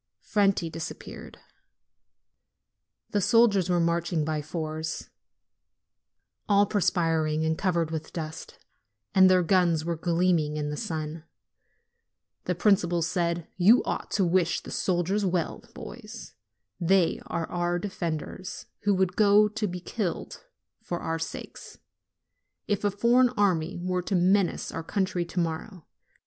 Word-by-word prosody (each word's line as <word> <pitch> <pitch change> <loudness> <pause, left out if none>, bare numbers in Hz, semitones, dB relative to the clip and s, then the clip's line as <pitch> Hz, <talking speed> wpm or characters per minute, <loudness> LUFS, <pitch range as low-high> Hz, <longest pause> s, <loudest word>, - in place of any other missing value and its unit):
Franti 195 -4 +2
disappeared. 165 0 -8 1.7
The 205 - +1
soldiers 200 -4 +4
were 175 -1 +2
marching 170 -1 0
by 155 -1 -1
fours, 155 +1 -5 1.4
all 200 0 +5
perspiring 165 -6 +1
and 160 0 +1
covered 170 -3 0
with 160 -1 -5
dust, 160 -1 -7 0.6
and 190 -1 +7
their 185 -1 +4
guns 170 -3 +2
were 170 0 -1
gleaming 165 -2 +1
in 150 0 -2
the - - -3
sun. 155 +1 -4 1.2
The 180 - 0
principal 175 -2 +2
said: 170 0 -1
"You 205 +7 +6
ought - - -3
to 195 - +2
wish 175 -1 +1
the - - -10
soldiers 185 +3 0
well, 180 -3 -1
boys. 230 -1 -9 0.5
They 180 0 +2
are 165 - -2
our 175 0 0
defenders, 175 -1 -5
who 205 -1 +1
would 185 -1 +1
go 210 0 +5
to 210 0 -2
be 180 -1 -5
killed 180 0 -4 0.4
for 175 - -4
our 165 0 -2
sakes, 160 - -7 0.9
if 205 -1 -1
a 205 - +3
foreign 235 +5 +4
army 180 -5 +1
were 180 +1 -1
to 190 +2 -2
menace 185 +1 +2
our 165 - -5
country 185 -1 -1
to 175 +1 -4
morrow. 170 +1 -4
175 Hz, 130 wpm, -27 LUFS, 165-195 Hz, 1.7 s, and